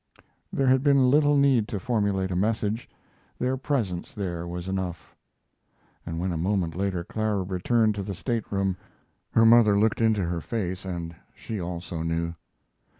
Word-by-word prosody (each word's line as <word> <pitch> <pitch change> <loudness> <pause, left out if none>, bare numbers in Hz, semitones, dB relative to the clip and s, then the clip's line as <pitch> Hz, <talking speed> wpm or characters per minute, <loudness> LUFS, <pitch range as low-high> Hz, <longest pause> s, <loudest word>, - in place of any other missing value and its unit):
There 135 - 0
had 130 0 +4
been 135 -3 +4
little 145 0 +4
need 135 -6 +4
to 105 - -3
formulate 100 -5 0
a - - -1
message 110 +3 -1 0.5
their 130 +1 0
presence 120 -10 -2
there 85 -4 -3
was 90 +1 -5
enough 95 -2 -4 0.9
and 80 0 -3
when 90 +1 -1
a 85 - -2
moment 90 -1 0
later 95 -2 -1
Clara 105 0 -1
returned 105 +5 +1
to 100 - -4
the 100 0 -5
stateroom 100 -3 -1 0.6
her 115 - +5
mother 115 -3 +6
looked 110 +2 +2
into 110 -3 +3
her 85 -1 -2
face 95 -4 -3
and 85 -2 -5 0.2
she 110 -4 -5
also 85 -1 -5
knew. 85 +1 -1
100 Hz, 155 wpm, -26 LUFS, 90-115 Hz, 0.9 s, mother